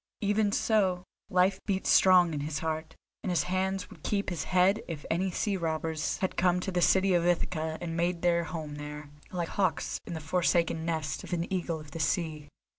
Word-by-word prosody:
Even 205 0 +2
so 195 -5 +2 0.3
life 185 +1 +3
beat 190 -2 -1
strong 180 -3 +6
in 150 - -2
his 150 +1 -3
heart, 160 0 -3 0.3
and 200 - -3
his 170 -3 +2
hands 185 +1 -1
would 165 -6 -14
keep 200 +1 -1
his 170 - -3
head 185 +3 +3
if 155 -4 -6
any 185 +3 +1
sea 200 +3 -1
robbers 160 -2 -2
had 190 - -2
come 180 0 +3
to 190 - -3
the 180 -1 0
city 190 +1 +4
of 175 -1 +3
Ithaca 160 -2 0
and 165 -2 -4
made 170 0 0
their 170 -1 +3
home 155 -4 -6
there, 150 0 -7 0.2
like 175 -2 -3
hawks 195 -2 0
in 170 - -4
the - - -4
forsaken 165 0 +1
nest 160 -3 -2
of - - -6
an 170 -1 0
eagle 170 -3 -1
of 150 -1 -12
the 165 - -6
sea. 155 -1 -1
175 Hz, 200 wpm, -29 LUFS, 160-185 Hz, 0.3 s, strong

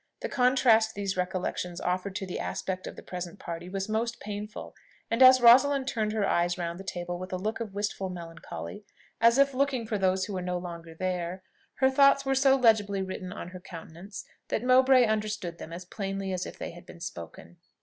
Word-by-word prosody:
The - - -3
contrast 245 -4 +3
these 195 -1 -2
recollections 180 -1 -2
offered 185 +2 -2
to 195 - -3
the 180 - -5
aspect 185 -1 -4
of - - -7
the - - -11
present 180 0 -6
party 170 -1 -7
was 195 +1 -3
most 230 +2 -1
painful; 210 +1 -7 0.4
and 230 +3 +1
as 255 0 +9
Rosalind 265 +3 +6
turned 215 -4 -1
her 210 -3 +1
eyes 175 +1 +1
round 170 0 -4
the - - -7
table 175 -2 -4
with 185 0 -7
a 185 - -1
look 215 +5 -3
of 215 -4 -6
wistful 200 -2 -2
melancholy, 165 - -8 0.4
as 230 +2 +6
if 275 0 +4
looking 260 -3 0
for 215 -2 -2
those 190 0 +2
who 205 - -6
were 185 - -2
no 180 0 -2
longer 170 -2 -8
there, 180 +1 -3 0.3
her 265 0 +3
thoughts 275 0 +5
were 270 - +2
so 270 0 +5
legibly 210 -6 +3
written 185 -1 -6
on 180 -3 -7
her 185 0 -9
countenance, 175 +3 -10 0.2
that - - -2
Mowbray 255 0 +6
understood 210 -6 -2
them 160 - -8
as 175 +2 -7
plainly 195 -1 -4
as 185 0 -3
if - - -10
they - - -5
had 175 0 -14
been 175 - -12
spoken. 85 - -9
195 Hz, 205 wpm, -28 LUFS, 180-230 Hz, 0.4 s, as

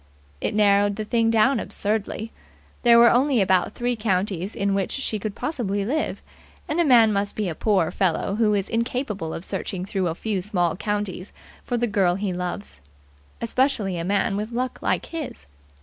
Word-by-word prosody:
It - - -1
narrowed 205 -1 +4
the 215 +1 -4
thing 230 +1 +2
down 230 +3 +3
absurdly. 215 +2 -3 0.5
There 235 -1 +6
were 235 0 +7
only 260 0 +3
about 190 0 +2
three 245 0 -1
counties 195 -3 -1
in 200 0 0
which 195 -1 -1
she 225 -6 -2
could 210 0 -4
possibly 205 -10 -2
live; 305 +8 -2 0.4
and 305 - -1
a - - +5
man 235 -7 +6
must 200 0 -1
be 210 -2 -1
a 170 - -2
poor 190 -2 +1
fellow 190 +1 0
who 210 0 +2
is 195 -1 -1
incapable 230 - -2
of 165 - -5
searching 185 -3 -4
through 190 -2 -1
a 165 - -2
few 205 0 -2
small 180 -4 0
counties 205 -1 -3 0.3
for 245 - -2
the 240 - +1
girl 195 -5 +2
he 195 -1 -2
loves. 180 - -5 0.6
Especially 230 -5 +1
a - - -2
man 195 +2 +1
with 210 +3 -3
luck 250 +2 -3
like - - 0
his. 310 - -6
210 Hz, 180 wpm, -24 LUFS, 195-235 Hz, 0.6 s, were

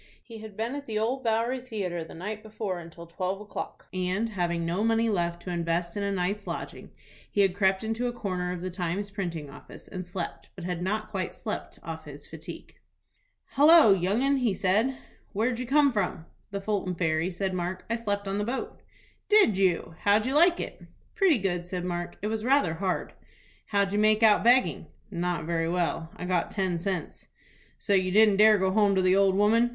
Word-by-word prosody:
He 225 -2 -11
had 215 -2 -10
been 230 +3 -2
at 285 0 -6
the 220 -2 -2
Old 245 +5 -1
Bowery 230 +3 0
Theatre 195 -9 -4
the 160 - -11
night 210 +5 -5
before 210 -4 -4
until 170 0 -11
twelve 185 +3 -3
o'clock, 210 0 -7
and, 185 +5 -1
having 170 -4 -1
no 175 +5 -1
money 225 0 +2
left 175 -4 -1
to 180 - -5
invest 170 0 -1
in 205 - -2
a 200 0 -1
night's 195 +2 -2
lodging, - - -6 0.4
he 205 - +2
had 195 -2 +3
crept 190 0 +2
into 225 +3 -1
a - - -1
corner 185 -6 -3
of 180 -1 -5
the 185 0 -4
"Times" 180 +3 -3
printing 170 -7 -4
office, 140 - -13
and 185 -1 -6
slept, 180 -1 -6
but 180 - -9
had 175 -1 -3
not 215 +3 -2
quite 190 -3 -3
slept - - -6
off - - -7
his - - -11
fatigue. - - -10 0.7
"Hallo, 295 -5 +7
young 195 +6 +1
'un!" 265 -7 +2
said 195 +7 +2
he. 265 - -4 0.4
"Where 220 +5 +1
did 240 -2 -3
you 250 - -4
come 285 0 +4
from?" 180 -6 -2 0.3
"From 200 0 -3
Fulton 195 -3 -1
Ferry," 160 0 0
said 190 +1 -2
Mark. 180 +1 -3
"I 230 - 0
slept 205 -3 -2
on 195 +1 -1
the - - 0
boat." 245 +5 -4 0.5
"Did 415 - +5
you? 185 -4 +1
How'd 205 +2 +3
you 260 - 0
like 345 +4 +5
it?" - - -6 0.3
"Pretty 385 - +4
good," 180 -4 -1
said 180 0 -4
Mark. 175 -1 -4
"It - - 0
was 220 0 -2
rather 260 - +3
hard." 185 +2 -2 0.5
"How'd 200 -1 +1
you 205 - +1
make 215 +1 +4
out 215 -2 +6
begging?" 250 +2 +3 0.2
"Not 175 -3 -2
very 165 0 0
well. 170 -2 -1
I - - -6
got 180 -2 0
ten 185 -4 -1
cents." 190 +1 -4 0.5
"So 205 - -1
you 185 -1 +3
didn't 210 0 +5
dare 215 +1 +7
to 210 - +2
go 190 0 +2
home 205 -1 +3
to 190 - +3
the 185 0 +4
old 195 -1 +4
woman?" 225 +4 +4
195 Hz, 210 wpm, -27 LUFS, 180-220 Hz, 0.7 s, Hallo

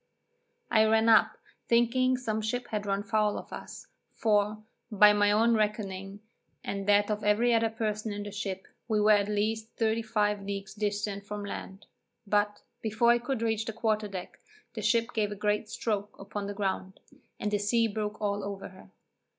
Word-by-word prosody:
I 220 -2 +5
ran 220 +1 +3
up, 220 - +5 0.3
thinking 255 +2 +3
some 220 -4 -2
ship 240 +3 -3
had 210 -1 -3
run 200 0 0
foul 210 0 +1
of - - -9
us, - - -8 0.3
for, 210 -1 +2 0.3
by 210 0 +7
my 205 0 +3
own 225 +3 +4
reckoning, 205 -2 -2 0.4
and 195 0 -4
that 205 +1 +4
of 210 0 -2
every 225 +4 +3
other 225 0 +3
person 215 -1 -3
in 205 0 -4
the 205 - -7
ship, 195 -2 -5 0.2
we 215 -3 +1
were 210 +1 +5
at 205 -1 +4
least 220 +2 -1
35 220 -2 +1
leagues 200 0 -5
distant 205 -1 -2
from 205 0 -5
land; 195 0 -7 0.4
but, 205 0 0 0.2
before 220 +2 +3
I 240 - +3
could 245 -1 -3
reach 220 -1 0
the 225 - -4
quarter 215 -1 0
deck, 190 -3 -8 0.3
the 220 - -5
ship 230 +2 +1
gave 210 -2 0
a - - -4
great 210 +1 -1
stroke 210 -2 -3
upon 200 +1 -5
the 205 - -5
ground, 190 -1 -3 0.4
and 210 - -2
the 205 - +1
sea 230 +3 +2
broke 215 0 -4
all 205 -1 -1
over 200 -1 -6
her. 185 - -16
210 Hz, 180 wpm, -29 LUFS, 205-220 Hz, 0.4 s, by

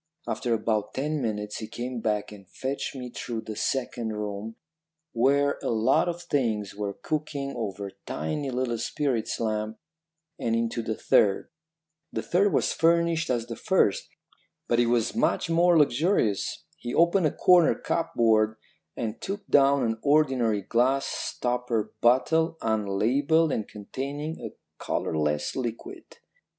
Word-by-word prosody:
After 120 -2 0
about 110 -2 -1
ten 150 +2 -1
minutes 105 -3 -3
he 110 - -6
came 125 +1 -5
back 105 -2 -1
and 100 -3 -13
fetched 135 +1 -4
me 125 -2 -6
through 120 -2 -4
the 110 - -7
second 120 -2 -2
room, 105 +1 -5 0.6
where 140 +4 +2
a - - -2
lot 115 +9 +3
of 175 0 -5
things 110 -8 -1
were 100 -1 -4
cooking 145 -3 -3
over 100 -4 -4 0.2
tiny 135 - -3
little 125 -2 -1
spirit 130 -2 -1
lamps, 110 -1 -2 0.6
and 115 0 0
into 115 +1 -1
the 110 -1 -3
third. 100 -2 +2 0.6
The - - -3
third 195 +3 +2
was - - +1
furnished 170 0 +2
as 120 -3 0
the 115 -1 -6
first, 190 - +1 0.6
but 120 - +2
it 120 - +3
was 120 - +1
much 225 -6 +1
more 170 +1 +5
luxurious. 145 - +1
He 120 - -5
opened 170 +1 +4
a - - -1
corner 180 -3 +5
cupboard 110 -9 +1 0.4
and 115 -2 -4
took 200 +1 -5
down 140 -1 +5
an 115 -1 -1
ordinary 130 -8 +2
glass 130 +6 +2
stopper 120 -3 -2
bottle, 160 +7 +3
unlabelled 115 +9 +2
and 110 - -2
containing 140 +9 -5
a - - -7 0.3
colourless 75 -1 -1
liquid. 120 -3 -5
120 Hz, 140 wpm, -27 LUFS, 110-145 Hz, 0.6 s, more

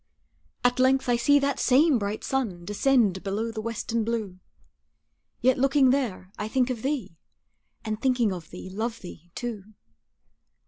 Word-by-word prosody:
At 245 0 +2
length 260 +1 +3
I 240 - +4
see 285 +5 +4
that 280 0 0
same 270 +1 +4
bright 205 +1 -3
sun 210 -11 -2
Descend 210 -2 +2
below 210 +4 -2
the 220 -1 -5
western 230 0 -2
blue, 215 -5 -3 1.0
Yet 255 +1 +3
looking 270 -1 +4
there, 225 -9 -2
I 210 - -2
think 255 +2 +1
of 235 -3 -4
thee, 250 - -3 0.7
And 215 0 -3
thinking 245 -6 +2
of 170 -4 -8
thee 180 - -9
love 225 +4 -3
thee, 175 -2 -11
too. 215 -4 -6
230 Hz, 150 wpm, -26 LUFS, 205-260 Hz, 1.0 s, I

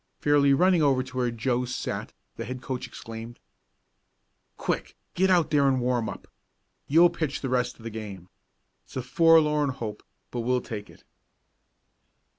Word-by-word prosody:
Fairly 145 -1 +4
running 180 +4 +4
over 135 -3 +3
to 130 - -12
where 125 -1 +1
Joe 120 +2 -1
sat 125 0 -4 0.2
the - - -5
head 130 +1 -5
coach 130 0 -4
exclaimed: 115 +1 -9 1.2
"Quick - - -3 0.2
get 190 +2 +2
out 170 -4 +3
there 145 -2 +4
and 130 -1 +2
warm 120 -2 0
up. - - -9 0.6
You'll 170 +4 +6
pitch 155 -4 -3
the 135 - -2
rest 125 -1 0
of 115 - -16
the 115 - -5
game. 100 -5 -7 0.6
It's - - -17
a 130 - -2
forlorn 150 +1 +4
hope, 110 -5 -5 0.3
but 120 - -3
we'll 125 +2 +1
take 105 -4 -7
it!" - - -17
130 Hz, 160 wpm, -27 LUFS, 120-150 Hz, 1.2 s, You'll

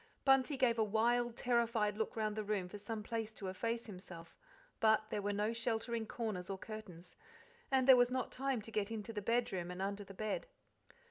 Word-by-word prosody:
Bunty 270 +1 +4
gave 240 -3 +3
a - - +5
wild, 235 +3 +2
terrified 230 -4 +2
look 220 +1 -2
round 215 -2 0
the 215 - -2
room 200 -3 -1
for 205 +3 -8
some 215 +1 -4
place 225 0 -3
to 195 -3 -5
efface 230 +5 -2
himself, 180 -4 -10 0.4
but 220 -1 +4
there 205 - -1
were 205 +1 0
no 210 +2 0
sheltering 230 0 -1
corners 210 -7 -3
or 195 - -2
curtains, 190 -5 -9 0.5
and 265 -1 +3
there 265 - +11
was 245 -1 +5
not 255 0 -1
time 265 -4 -1
to 225 - -8
get 210 -1 0
into 225 0 -5
the 205 - -3
bedroom 195 -6 0
and 180 0 -6
under 200 +1 -2
the 195 0 -12
bed. 215 - -2
220 Hz, 200 wpm, -36 LUFS, 205-235 Hz, 0.5 s, there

